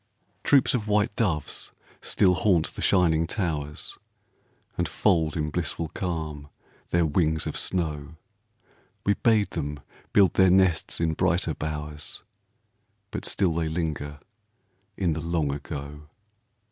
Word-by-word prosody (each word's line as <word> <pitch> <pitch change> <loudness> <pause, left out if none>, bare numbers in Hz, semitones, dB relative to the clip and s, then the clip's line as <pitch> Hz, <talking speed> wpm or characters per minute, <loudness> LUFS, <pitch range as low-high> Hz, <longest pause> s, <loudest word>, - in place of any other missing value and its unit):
Troops 140 -3 +4
of 110 -4 -1
white 105 +2 +2
doves 90 - -1 0.3
still 95 -2 +3
haunt 85 -2 +2
the - - -7
shining 85 -3 +3
towers, 75 -7 -3 0.8
And 85 - 0
fold 80 -2 +2
in 75 -1 -1
blissful 80 0 -1
calm, 80 -6 -4 0.4
their 85 -1 +3
wings 80 0 +1
of - - -3
snow; 80 -4 -1 0.9
We 100 - +4
bade 110 -1 +2
them 75 -3 -4 0.3
build 100 -3 +5
their 95 -1 +5
nests 95 -3 +3
in 80 -1 +1
brighter 85 -1 +1
bowers, 75 0 -5 0.9
But - - -4
still 95 -5 +1
they 80 -1 -1
linger 75 -3 -3 0.8
in 90 -4 +1
the 80 - -3
Long 80 -3 0
Ago. 75 +1 -7
80 Hz, 125 wpm, -26 LUFS, 75-90 Hz, 0.9 s, build